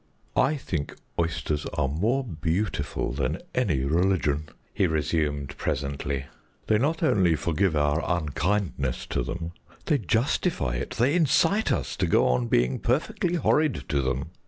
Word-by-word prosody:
"I 135 +4 +3
think 85 - -4 0.2
oysters 80 -3 -1
are 75 -4 +1
more 110 - +1
beautiful 90 - -2
than 65 0 -1 0.2
any 95 - +1
religion," 75 -2 +1 0.2
he 95 - +2
resumed 75 -3 -1
presently. 70 -1 -2 0.4
"They 110 - +3
not 160 +7 0
only 95 - +4
forgive 85 +2 +1
our 75 +2 +2
unkindness 80 -4 -1
to - - -1
them; 85 +7 -4 0.3
they 150 -4 +2
justify 115 - 0
it, - - -4
they 125 +5 +3
incite 175 +5 +3
us - - -1
to - - +1
go - - +4
on 60 -1 +1
being 60 +2 +2
perfectly 175 - 0
horrid 155 -3 +2
to 70 -2 +2
them. 65 +4 -2
80 Hz, 140 wpm, -26 LUFS, 70-120 Hz, 0.4 s, only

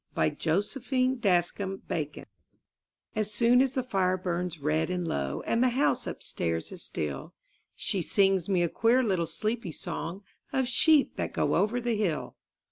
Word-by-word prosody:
MY 80 - +3
BOOK - - -17
HOUSE 175 +6 +1
THE 270 - -7
SLEEPY 255 -9 +2
SONG 175 -5 -5 0.9
As 215 -1 0
soon 235 +3 +4
as 265 -1 +1
the 260 -2 -1
fire 185 -6 +1
burns 180 -1 -2
red 155 +3 0
and 180 -2 -2
low 70 - -2
And 230 - +1
the 255 - +5
house 260 +4 +1
upstairs 80 -1 -3
is - - -7
still 70 -3 -4 0.4
She 190 - -1
sings 195 0 +2
me 180 -3 +3
a - - +2
queer 235 +7 +3
little 185 -7 0
sleepy 210 +4 -2
song, 170 +5 -5 0.3
Of 265 -2 +1
sheep 300 +3 +4
that - - -3
go - - +1
over 220 +4 +2
the 240 -1 0
hill. 195 -7 -1
195 Hz, 170 wpm, -28 LUFS, 170-240 Hz, 0.9 s, the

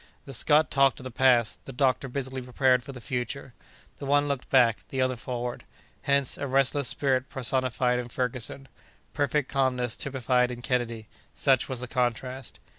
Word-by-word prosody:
The 135 - -8
Scot 150 +4 +3
talked 135 -1 +3
of - - -10
the 130 - -6
past; 120 -3 +3
the - - -7
doctor 130 +1 +1
busily 130 0 -4
prepared 125 0 +2
for 140 - -9
the 130 - -9
future. 125 0 -4 0.5
The 140 - -6
one 145 +1 +3
looked 140 -3 -3
back, 120 -5 +4
the 135 - -4
other 130 0 +1
forward. 120 0 -5 0.4
Hence, 140 -2 +1
a 140 - -2
restless 135 +1 +2
spirit 130 0 0
personified 130 -1 0
in 120 -1 -5
Ferguson; 125 +2 -3 0.5
perfect 145 -1 0
calmness 125 -3 0
typified 125 -2 0
in 120 0 -8
Kennedy—such 120 +2 -1
was 130 -2 -4
the 125 - -4
contrast. 125 +1 -2
130 Hz, 165 wpm, -27 LUFS, 125-135 Hz, 0.5 s, back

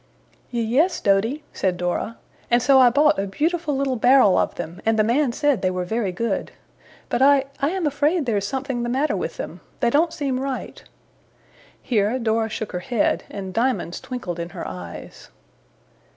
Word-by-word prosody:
'Ye 235 -2 -1
yes, 295 +11 +2
Doady,' 220 +9 +1
said 185 -2 -1
Dora, 180 +6 -2 0.3
'and 240 - +4
so 265 +2 +5
I 250 -1 +7
bought 290 0 +3
a 200 - -1
beautiful 310 - -1
little 270 -2 0
barrel 245 -4 +5
of - - +1
them, 170 +4 -7
and 225 0 +2
the 215 - +4
man 245 +4 +2
said 280 -3 +1
they 185 - +2
were 180 -1 -2
very 220 0 -1
good. 230 +6 -2 0.6
But - - -1
I 275 0 +5
I 280 0 +1
am 370 -1 -2
afraid 295 +3 +1
there's 205 -4 0
something 265 0 -3
the 240 - -2
matter 280 +4 +1
with - - -4
them. - - -7 0.2
They 240 -2 +2
don't 320 +5 +3
seem 275 -5 -2
right.' 270 -1 -5 1.0
Here 220 0 +1
Dora 225 -2 0
shook 215 0 -5
her 180 - -3
head, 235 +3 0
and 190 -2 -6
diamonds 230 -6 0
twinkled 195 -10 -5
in 170 0 -4
her - - -4
eyes. 90 -2 -9
240 Hz, 180 wpm, -22 LUFS, 200-275 Hz, 1.0 s, I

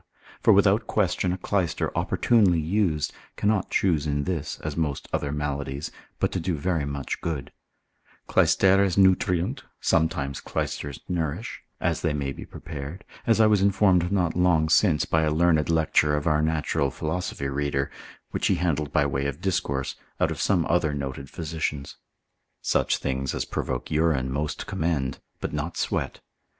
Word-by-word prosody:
For - - +5
without - - +4
question, 90 - +1
a 90 - -2
clyster 95 -2 -1
opportunely 100 -8 +3
used, 80 -2 0 0.2
cannot 105 -2 +1
choose 80 -6 +1
in 70 -1 0
this, 80 -3 -3
as 75 -1 -4
most 75 -4 -2
other 70 - -1
maladies, 70 -1 -3 0.3
but - - +1
to 95 - -1
do 90 0 -1
very 80 0 0
much 70 -2 -4
good; 75 -5 -3 0.8
Clysteres 95 -1 +4
nutriunt, 90 -2 +3 0.2
sometimes 75 -4 0
clysters 70 -2 -4
nourish, 85 +5 -3 0.2
as - - 0
they 80 -3 0
may 70 -2 -2
be - - -8
prepared, 75 +5 -7 0.2
as 115 -1 +4
I 110 - +7
was 105 -2 +4
informed 95 -3 +3
not 90 -5 +1
long 85 -3 +3
since 80 -2 +4
by 80 - +2
a 80 - +2
learned 80 0 +2
lecture 80 -2 +3
of 75 - -2
our 75 -2 +3
natural 80 -2 0
philosophy 80 -1 -3
reader, 70 0 -1 0.4
which - - 0
he - - +3
handled 75 -4 -1
by 75 - +3
way 70 0 -1
of 70 +1 -4
discourse, 85 -8 -1 0.2
out - - +2
of - - -4
some 90 -5 +2
other 80 -4 +1
noted 70 -1 -5
physicians. 80 -3 -4 0.7
Such - - +2
things 65 0 -2
as - - -2
provoke - - -3
urine 75 -5 +1
most 75 +3 -2
commend, 75 -5 -1 0.2
but - - -4
not 75 +3 -3
sweat. - - -2
80 Hz, 160 wpm, -26 LUFS, 70-90 Hz, 0.8 s, I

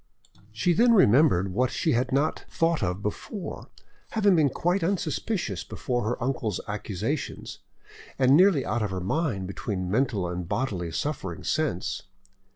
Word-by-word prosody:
She 115 +12 +1
then 235 +6 +5
remembered, 115 - +4
what 125 +5 +2
she 160 - 0
had 125 +2 +1
not 140 +4 0
thought 165 -1 +1
of 90 0 -2
before, 175 - -5 0.4
having 205 -4 +4
been 155 -4 +4
quite 175 +6 0
unsuspicious 165 - -1
before 120 -1 -3
her 120 +2 -2
uncle's 120 -6 -1
accusation, 105 -3 -3 0.7
and 130 +1 +5
nearly 175 -5 +5
out 120 - -1
of 105 - 0
her 95 -1 -3
mind 100 - -1
between 95 -1 -4
mental 110 -5 +1
and 90 0 -5
bodily 100 -7 -2
suffering 70 - -3
since. - - -1
125 Hz, 145 wpm, -26 LUFS, 100-165 Hz, 0.7 s, then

